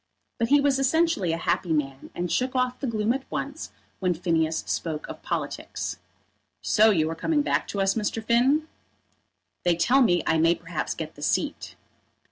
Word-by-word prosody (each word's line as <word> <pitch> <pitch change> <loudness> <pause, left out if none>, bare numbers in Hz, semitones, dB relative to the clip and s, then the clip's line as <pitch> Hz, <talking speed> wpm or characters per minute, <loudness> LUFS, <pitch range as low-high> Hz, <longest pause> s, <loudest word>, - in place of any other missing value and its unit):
But 230 - +1
he 290 +4 +5
was 280 -1 +2
essentially 270 - +2
a 165 - -1
happy 170 +1 -1
man, 135 -3 -2
and 175 -1 -3
shook 255 +1 0
off 255 0 0
the 275 - -3
gloom 220 0 +1
at 265 0 -6
once 285 +3 -5 0.3
when 180 -2 +1
Phineas 160 -2 0
spoke 155 -2 -3
of - - -9
politics. - - -4 0.6
"So 220 +1 +5
you 160 -7 +2
are - - -4
coming 295 - +1
back - - 0
to 200 - -4
us, 195 0 +3
Mr. 220 +1 -2
Finn?" 260 +7 +3 1.0
"They 175 -1 +3
tell 255 +10 +3
me 175 -8 +3
I 160 - +2
may 165 +2 +4
perhaps 170 -1 -4
get - - -6
the - - -14
seat." - - -1
210 Hz, 180 wpm, -26 LUFS, 165-265 Hz, 1.0 s, he